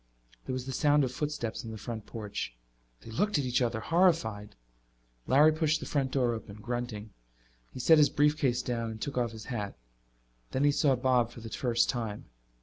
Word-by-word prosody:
There 130 - -2
was 130 -1 -3
the 135 - -4
sound 145 +2 +3
of 130 - -1
footsteps 145 -5 -3
on 115 - -7
the 110 - -6
front 110 0 -6
porch. 105 - -5 0.5
They 115 - -11
looked 205 - +1
at 140 - 0
each 125 0 +1
other, 115 -2 0
horrified. 110 - +1 0.7
Larry 150 +4 +6
pushed 155 0 +1
the - - -6
front 140 -3 0
door 125 -3 +1
open, 110 -3 -7
grunting. 110 -1 -5 0.6
He - - -8
set 160 +5 +6
his 150 - +6
briefcase 145 -4 +2
down 115 -2 -2
and 110 -1 -7
took 140 - -4
off 120 -2 0
his 110 -1 -9
hat. 105 -6 -4 0.8
Then 130 - +1
he 145 - +5
saw 140 -2 +3
Bob 125 -2 +2
for 120 - -11
the 115 - -7
first 120 -1 +1
time. 115 -5 -3
125 Hz, 195 wpm, -30 LUFS, 115-145 Hz, 0.8 s, Larry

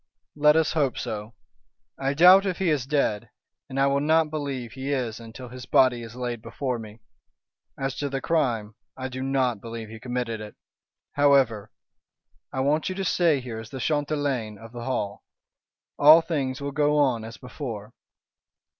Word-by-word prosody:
"Let 150 0 +5
us 160 -1 +3
hope 140 -6 +1
so. 105 +1 -5 0.6
I 135 +1 0
doubt 185 +5 +7
if 185 - -1
he 185 -4 +1
is 135 -4 -1
dead, 140 -8 0 0.4
and 130 - -3
I 135 - +4
will 140 0 +2
not 155 +1 +2
believe 140 -6 -4
he 135 +3 -5
is 120 -5 -2
until 115 +2 -10
his 125 0 -9
body 125 -2 +4
is 115 0 -9
laid 120 -2 -4
before 125 +2 -3
me. 110 0 -11 0.8
As 135 -1 -2
to 145 - -2
the 135 0 -2
crime, 120 -10 0 0.2
I 130 0 -4
do 130 0 -6
not 130 -5 0
believe 115 -1 -7
he 110 0 -9
committed 120 -2 -3
it. 105 -1 -9 0.6
However, 135 -7 +3 0.8
I 130 - -2
want 150 +5 +1
you 185 - -4
to 195 0 -3
stay 165 -6 +2
here 120 -3 -6
as 110 0 -9
the 130 - -7
chatelaine 145 -7 -1
of 115 +2 -12
the 120 -1 -7
Hall. 105 -6 -2 0.8
All 155 +3 +9
things 140 -5 -2
will 140 0 -3
go 150 +1 +2
on 130 -6 +2
as 115 +1 -9
before." 120 -5 -7
130 Hz, 175 wpm, -25 LUFS, 115-145 Hz, 0.8 s, All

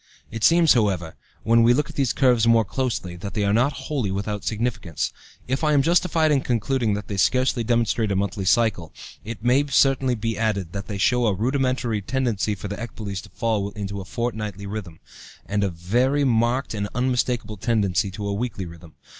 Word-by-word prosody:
It 115 -1 -5
seems, 165 -1 +6
however, 95 -9 0 0.3
when 115 +1 +4
we 120 +1 +5
look 150 +2 0
at - - -17
these 135 -4 +1
curves 125 -4 +3
more 115 -1 +5
closely, 110 -6 -3
that 100 +3 -7
they 105 - 0
are 100 0 +2
not 125 +6 +2
wholly 130 -9 -1
without 100 +2 -3
significance. 110 - -2 0.3
If 130 +4 -1
I 150 -1 +3
am 140 -2 +4
justified 165 -1 +2
in 140 -2 +3
concluding 120 -2 0
that 105 -1 -6
they 100 - -4
scarcely 125 +3 +2
demonstrate 115 -2 +1
a - - 0
monthly 95 0 -2
cycle, 100 -5 +2 0.3
it 115 0 -7
may 125 +4 +4
certainly 135 -2 +3
be 115 0 -3
added 100 -6 -1
that 100 -1 -5
they 105 - -4
show 125 +4 +2
a 100 - +1
rudimentary 125 -1 0
tendency 110 -3 -1
for 100 - -7
the 100 +1 -5
ecboles 100 -5 -5
to - - -14
fall 110 -3 -1
into 100 -2 -5
a - - -9
fortnightly 105 -3 -4
rhythm, 100 -5 -6 0.5
and 100 0 -1
a 100 - +1
very 120 +12 +1
marked 120 +1 +1
and 100 -1 -3
unmistakable 125 -3 0
tendency 100 -5 +1
to 100 +2 -5
a 100 - -1
weekly 105 -3 -3
rhythm. 85 -2 -12
110 Hz, 195 wpm, -23 LUFS, 100-125 Hz, 0.5 s, seems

